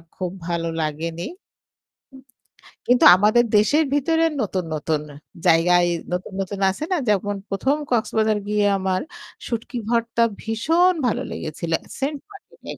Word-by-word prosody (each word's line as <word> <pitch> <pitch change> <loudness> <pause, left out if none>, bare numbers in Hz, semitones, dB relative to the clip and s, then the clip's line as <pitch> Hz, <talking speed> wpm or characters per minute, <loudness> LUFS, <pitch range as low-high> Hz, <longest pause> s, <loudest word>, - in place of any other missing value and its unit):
খুব 180 -2 -4 0.2
ভালো 170 -1 -2
লাগেনি। 160 +2 -3
উ 365 - -15 1.5
কিন্তু 245 0 +4
আমাদের 215 +5 +4
দেশের 290 +10 +4
ভিতরে 325 +3 +2 0.2
নতুন, 185 -3 -2
নতুন, 155 0 -1 0.4
জায়গায় 175 +1 +4 0.2
নতুন, 180 +2 -3
নতুন, 195 +1 -4
আছে 245 +11 -5
না - - +3
যেমন 205 0 +1
১ম 265 +9 +1
কক্সবাজার 220 -2 +1
গিয়ে 210 -1 +2
আমার 190 -1 -1 0.5
শুটকি 235 +1 -4
ভর্তা 235 0 +1 0.2
ভীষণ 325 +12 +2
ভালো 220 - -1
লেগেছিল। 165 +2 -5 0.3
Saint 280 +2 -1
Martin 400 - -17
210 Hz, 125 wpm, -22 LUFS, 175-245 Hz, 1.5 s, কিন্তু